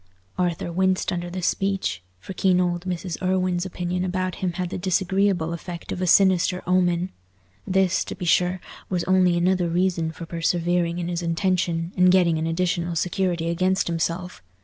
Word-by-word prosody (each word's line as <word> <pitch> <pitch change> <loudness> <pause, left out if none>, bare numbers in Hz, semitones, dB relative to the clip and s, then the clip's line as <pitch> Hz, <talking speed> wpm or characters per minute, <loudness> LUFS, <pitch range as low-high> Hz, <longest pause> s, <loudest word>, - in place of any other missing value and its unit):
Arthur 175 -1 -1
winced 185 +1 +1
under 175 0 -3
this 180 0 -4
speech, 195 - -1 0.2
for 145 - -8
keen 185 -1 +2
old 175 0 -1
Mrs. 180 -1 -4
Irwine's 185 -1 0
opinion 180 0 -3
about 185 0 -1
him 180 -2 -1
had 180 0 -3
the - - -3
disagreeable 190 -2 +1
effect 170 0 -7
of 185 - -4
a 185 - 0
sinister 185 -1 +4
omen. 180 0 +1 0.6
This, 190 -1 +2
to - - -6
be 180 - -6
sure, 180 +2 +2 0.3
was 180 -2 -1
only 185 -2 +3
another 180 0 +1
reason 175 -2 0
for 165 +1 -8
persevering 170 +1 0
in 175 -1 -3
his 175 0 -2
intention, 170 -1 0
and 180 -1 +5
getting 175 -4 +3
an 160 - -1
additional 175 0 -1
security 175 -1 -1
against 185 +3 +1
himself. 170 +2 -2
180 Hz, 170 wpm, -24 LUFS, 170-185 Hz, 0.6 s, and